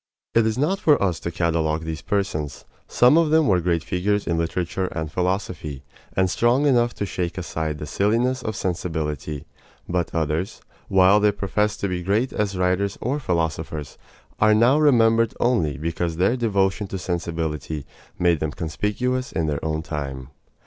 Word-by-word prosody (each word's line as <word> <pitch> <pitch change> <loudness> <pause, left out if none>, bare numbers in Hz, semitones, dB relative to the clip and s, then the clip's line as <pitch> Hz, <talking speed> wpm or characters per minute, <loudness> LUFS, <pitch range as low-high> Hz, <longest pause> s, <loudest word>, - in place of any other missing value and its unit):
It 115 -1 +4
is 110 +1 -1
not 160 +9 +1
for 150 -6 +4
us 90 -4 0
to - - -4
catalogue 80 -2 0
these 80 -1 -5
persons. 75 -8 -2 0.2
Some 125 +7 +5
of 165 -2 +2
them 160 0 +4
were 90 -3 +3
great 85 -1 0
figures 100 +5 0
in 85 - 0
literature 85 +3 -1
and 80 -3 -4
philosophy, 90 -6 -2 0.3
and 95 0 +3
strong 120 +9 +2
enough 120 -4 +3
to 100 - -2
shake 90 -2 -3
aside 80 -4 -3
the 75 - -6
silliness 115 - +1
of 110 -3 -4
sensibility; 80 -6 -3 0.4
but 90 -1 -1
others, 80 +3 -1 0.3
while 95 +2 +5
they 105 0 +4
professed 105 +1 -1
to 100 - +1
be 90 -2 -2
great 105 +8 0
as 100 -2 -1
writers 90 +2 0
or 135 +5 -1
philosophers, 80 - -3 0.4
are 110 0 +5
now 120 +7 +4
remembered 115 -6 +4
only 95 - +1
because 85 +2 -2
their 95 +7 +3
devotion 100 -4 0
to 95 - -4
sensibility 80 -4 -3 0.3
made 85 -3 +2
them 80 0 -2
conspicuous 125 +10 -2
in 80 - -1
their 75 -2 -2
own 80 0 -1
time. 70 -4 -5
90 Hz, 165 wpm, -23 LUFS, 80-110 Hz, 0.4 s, Some